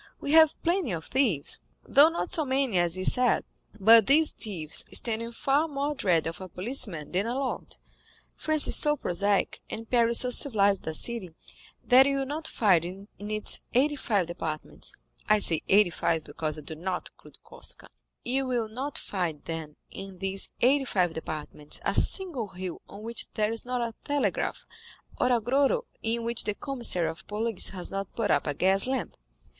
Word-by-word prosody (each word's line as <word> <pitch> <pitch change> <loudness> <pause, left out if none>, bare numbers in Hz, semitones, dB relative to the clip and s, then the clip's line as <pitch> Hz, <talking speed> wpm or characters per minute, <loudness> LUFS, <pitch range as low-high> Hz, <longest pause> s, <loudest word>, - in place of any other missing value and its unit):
We 285 - -3
have 315 -1 +6
plenty 340 - 0
of 160 -1 -5
thieves, 230 - 0 0.3
though 290 +3 +6
not 340 +2 -4
so 330 -4 +3
many 265 -7 +1
as 175 0 +1
is 185 - +2
said; 250 -1 +2 0.4
but 225 +2 +7
these 300 +3 +5
thieves 170 -9 -2
stand 225 -1 +3
in 230 0 -5
far 275 +6 +1
more 285 0 -2
dread 180 - +1
of 165 +3 -5
a 185 - -8
policeman 180 - -3
than 195 +5 0
a 240 - -2
lord. 270 -1 -4 0.6
France 310 -1 +2
is - - +3
so 295 0 +4
prosaic, 200 -1 0
and 225 +1 -6
Paris 235 -1 +3
so 250 - 0
civilized 205 - +1
a 160 - -3
city, 195 -5 -3 0.5
that 260 +2 +6
you 275 0 0
will 270 - -1
not 310 +4 -4
find 190 -7 +3
in 190 +3 -8
its 210 +1 +2
eighty 290 +4 +3
five 205 -9 0
departments—I 155 - -3
say 165 -6 +3
eighty 200 -2 +5
five, 160 -1 -1
because 155 0 -4
I 155 - -9
do 160 - -7
not 180 +4 -4
include - - -19
Corsica—you 265 +2 -6
will 240 -3 -1
not 265 +6 -4
find, 170 -7 -4
then, 160 -2 -6 0.2
in 195 -1 -9
these 195 +1 0
eighty 270 +3 +4
five 180 -8 0
departments 155 -2 -4
a - - +1
single 335 - -1
hill 185 -2 -7
on 200 +2 -11
which 230 0 -5
there 215 0 +1
is 225 +1 -4
not 250 0 -2
a 230 - -9
telegraph, 290 -1 -1 0.5
or 250 - +2
a 240 - +3
grotto 275 - +1 0.2
in 230 +1 -2
which 235 0 -1
the 210 - -1
commissary 235 - +1
of 160 +2 -7
police 220 0 +1
has 185 -2 -7
not 195 -1 -5
put 225 -3 0
up 145 - +1
a 145 - -1
gaslamp. 195 - +2
220 Hz, 180 wpm, -27 LUFS, 180-265 Hz, 0.6 s, but